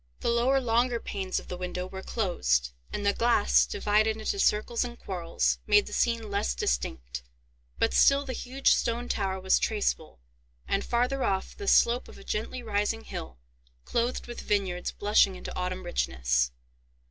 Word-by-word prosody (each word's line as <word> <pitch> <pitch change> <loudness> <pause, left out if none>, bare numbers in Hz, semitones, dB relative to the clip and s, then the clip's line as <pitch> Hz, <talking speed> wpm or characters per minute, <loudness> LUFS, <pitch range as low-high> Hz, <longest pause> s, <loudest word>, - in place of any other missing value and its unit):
The - - 0
lower 250 +3 +3
longer 240 0 +1
panes 190 -4 -3
of - - -13
the 180 - -5
window 180 0 -4
were 190 +1 -7
closed, 65 - 0 0.2
and 205 - -4
the 200 - +3
glass, 60 - +3
divided 215 - +1
into 220 - -2
circles 230 - +2
and 240 -1 -6
quarrels, 175 -6 -1
made 205 -1 +5
the - - -9
scene 230 -3 0
less 65 - 0
distinct; 60 0 -2 0.6
but - - +1
still 275 - +5
the 260 - -4
huge 260 +3 +1
stone 235 +1 -1
tower 190 -4 -1
was 190 0 +3
traceable, 205 - -1 0.5
and, 195 - 0
farther 250 +3 0
off, 190 -1 -1
the 405 - -7
slope 240 -6 +4
of - - -13
a - - -12
gently 225 +5 -3
rising 215 +1 -1
hill, 65 - -7 0.5
clothed 240 +1 -1
with 240 - -7
vineyards 190 -4 -1
blushing 205 -2 +3
into - - -8
autumn 185 0 -3
richness. 60 - 0
205 Hz, 165 wpm, -28 LUFS, 180-235 Hz, 0.6 s, made